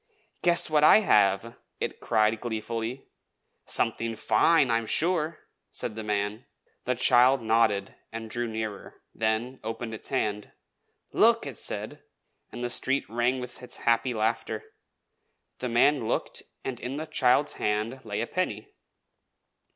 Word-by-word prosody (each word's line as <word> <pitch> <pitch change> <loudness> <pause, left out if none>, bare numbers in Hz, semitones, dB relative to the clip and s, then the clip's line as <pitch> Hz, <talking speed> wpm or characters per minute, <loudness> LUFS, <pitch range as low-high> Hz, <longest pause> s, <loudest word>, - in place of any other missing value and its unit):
"Guess 175 -1 +5
what 150 -1 +3
I 210 - +7
have!" 105 - +2 0.2
it - - -4
cried 110 0 +1
gleefully. 115 +2 -4 0.6
"Something 115 -1 +1
fine, 160 +1 +3
I 115 - +3
am 115 - -7
sure!" 165 +1 +1 0.3
said 105 - -4
the 110 - -5
man. 105 +2 -2 0.4
The 125 - 0
child 125 +1 +4
nodded 110 -3 +1 0.2
and 115 0 -6
drew 120 +2 -2
nearer; 110 -2 -6
then 115 +4 -1
opened 115 +1 -5
its 110 - -5
hand. 105 -6 -2 0.6
"Look!" - - +4
it - - -6
said; - - 0 0.5
and 120 - -7
the 120 - -1
street 135 +3 0
rang 120 +3 +1
with 125 0 -8
its 125 - -4
happy 120 +1 +2
laughter. 110 0 -1 1.0
The 125 - -3
man 120 +1 +3
looked, - - -2 0.2
and 125 -3 -4
in 125 +2 -5
the 155 +2 -4
child's 145 -2 +2
hand 110 +5 -1
lay 105 -1 -3
a - - -1
penny. 185 - -3
115 Hz, 145 wpm, -27 LUFS, 110-130 Hz, 1.0 s, I